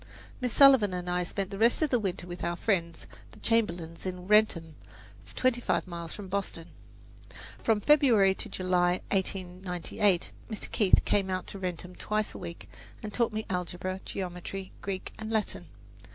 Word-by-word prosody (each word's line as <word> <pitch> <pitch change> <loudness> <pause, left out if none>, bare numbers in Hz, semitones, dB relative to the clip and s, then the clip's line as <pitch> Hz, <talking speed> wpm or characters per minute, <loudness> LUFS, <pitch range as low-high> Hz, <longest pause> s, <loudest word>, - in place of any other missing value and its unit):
Miss 250 -2 -1
Sullivan 265 -9 +7
and 180 0 -4
I 180 0 +1
spent 195 +2 -3
the 195 - -5
rest 235 +7 +4
of 305 - 0
the 245 - +4
winter 190 -4 -3
with 175 0 -7
our 170 0 0
friends, 170 -4 -1 0.3
the - - -15
Chamberlins 175 -8 0
in 180 -1 -5
Wrentham, 205 -7 +3 0.6
twenty 255 -1 +2
five - - 0
miles 170 -2 -6
from 205 -2 -8
Boston. 185 -4 -4 0.9
From 220 -2 +2
February 235 -9 +5
to - - -6
July, 180 -1 +1
1898, 185 -1 0 0.2
Mr. 215 - -6
Keith 200 -4 +4
came 195 -2 +2
out 185 0 -2
to 200 - -7
Wrentham 180 -1 -4
twice 215 +3 -2
a - - -8
week, 170 -2 -8 0.4
and 210 -1 -5
taught 235 -2 +1
me 215 0 -3
algebra, 180 +1 -3
geometry, 185 +1 -5
Greek 190 -1 -4
and 220 0 -5
Latin. 220 -2 -1
190 Hz, 165 wpm, -29 LUFS, 180-215 Hz, 0.9 s, Sullivan